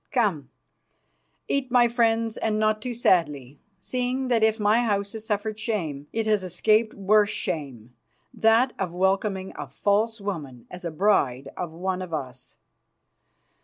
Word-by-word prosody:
Come, 195 - 0 1.0
eat, 275 -2 -1
my 240 -1 +5
friends, 230 -1 +1
and 215 -1 -1
not 215 0 +1
too 245 +1 -4
sadly, 150 - +1 0.2
seeing 255 +1 -2
that 235 -2 +2
if 220 0 +3
my 215 +3 +3
house 200 -3 -1
has 220 0 -8
suffered 215 0 -2
shame, 160 - -3
it 225 -1 -1
has 210 -3 +2
escaped 215 +5 +1
worse 205 +1 +3
shame, 130 - -5 0.4
that 230 +3 +3
of 185 -3 -2
welcoming 190 +1 0
a - - -6
false 220 +3 0
woman 150 - -6
as 180 +1 -9
a 170 - -2
bride 145 -7 +1
of 175 -3 -4
one 185 +3 -3
of 175 -3 -4
us. 130 -3 -8
205 Hz, 150 wpm, -25 LUFS, 170-225 Hz, 1.0 s, my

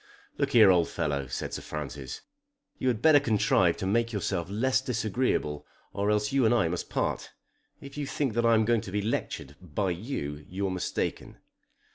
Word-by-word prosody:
"Look 140 -1 0
here, 110 -5 +8
old 85 -2 +3
fellow," 70 -2 -2
said - - -4
Sir - - -4
Francis. 70 -3 -6 0.6
"You 130 - -1
had 120 -3 0
better 155 -2 +7
contrive 105 -8 +2
to - - -4
make 115 +4 +1
yourself 95 -5 -2
less 130 +6 +1
disagreeable 115 - -1 0.3
or 100 +1 0
else 105 0 +1
you 135 -1 +2
and 115 +1 +4
I 105 -8 +3
must 90 +1 -4
part. - - -2 0.5
If 140 +1 -10
you 145 - -3
think 135 -4 -1
that 120 +1 +1
I 115 0 +5
am 110 0 +3
going 115 -1 +2
to 95 - -8
be 105 +1 -1
lectured 75 - -3
by 90 +2 -2
you, 85 - -4
you're 95 +1 -2
mistaken." 90 -1 -3
105 Hz, 185 wpm, -28 LUFS, 90-120 Hz, 0.6 s, here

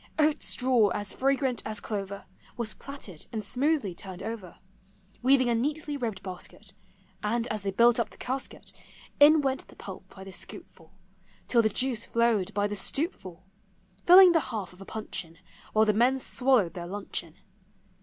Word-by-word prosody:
Oat 305 -1 +3
straw 250 -4 +2
as 205 -1 -4
fragrant 265 -3 +1
as 215 +1 -4
clover, 200 -2 -5 0.3
Was 230 -3 -3
platted, 245 - -10
and 220 -2 -3
smoothly 260 - 0
turned 185 +1 -8
over, 220 -6 -6 0.6
Weaving 255 0 +4
a 240 - +2
neatly 295 +5 -1
ribbed 230 -8 -4
basket; 195 +2 -8 0.5
And, 230 +2 0
as 215 -1 -3
they 195 - -2
built 235 +4 +4
up 230 - 0
the - - -18
casket. 260 +2 -5 0.5
In 300 +2 +8
went 270 -1 -1
the - - -16
pulp 190 -1 -9
by 190 - -9
the 195 - -9
scoop - - -7
full, 165 +3 -21 0.5
Till 235 - +5
the 220 - +2
juice 240 +1 -1
flowed 230 -4 +1
by 205 0 +2
the 205 0 -2
stoup 310 - -1
full, 185 0 -12 0.3
— - - -34
Filling 365 +1 +10
the 335 - +4
half 210 -7 -4
of 180 - -16
a - - -9
puncheon 180 -7 -5 0.3
While 220 0 +4
the 215 - +3
men 245 +5 +3
swallowed 250 -9 +1
their 175 -1 -6
luncheon. 200 +2 -4
225 Hz, 175 wpm, -28 LUFS, 195-265 Hz, 0.6 s, Filling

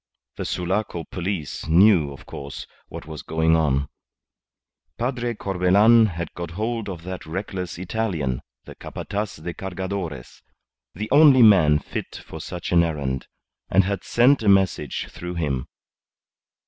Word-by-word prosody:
The - - -4
Sulaco 90 -1 -2
police 90 -4 -4
knew, 85 -3 +5
of 70 - -12
course, 70 -1 -8 0.2
what - - -9
was 80 -1 -7
going 80 0 +2
on. 70 -3 +1 1.1
Padre 120 0 -2
Corbelan 100 +4 +4
had 85 -3 -5
got 85 -1 -6
hold 110 -1 -2
of 85 -3 -7
that 95 -2 -7
reckless 90 0 -4
Italian, 90 - -2 0.2
the - - -10
Capataz 105 0 -5
de 85 0 -4
Cargadores, 95 -7 -5 0.5
the 105 +4 -4
only 140 -3 +7
man 90 -9 +6
fit - - -6
for - - -8
such 90 -1 -6
an 85 -1 +5
errand, 70 -6 -2 0.4
and 95 +2 +4
had 100 0 -2
sent 125 +3 +4
a 105 - +2
message 95 -8 +2
through 90 0 -7
him. 70 -6 -2
90 Hz, 135 wpm, -23 LUFS, 80-105 Hz, 1.1 s, only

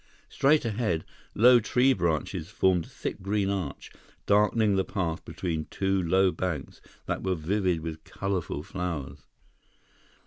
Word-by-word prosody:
Straight 145 0 +3
ahead, 105 -7 -1 0.3
low 120 +3 +7
tree 125 +4 +3
branches 85 -1 -1
formed 95 -5 +2
a - - -16
thick - - -5
green 100 0 0
arch, 95 -8 -4 0.3
darkening 105 0 +3
the 95 - +2
path 85 -6 -3
between 80 -4 -3
two 95 -1 0
low 95 +2 +3
banks 90 -7 -4 0.2
that - - -2
were 95 -1 0
vivid 90 +1 0
with 80 -1 -6
colorful 95 -7 -3
flowers. 85 -7 -5
95 Hz, 135 wpm, -27 LUFS, 85-105 Hz, 0.3 s, low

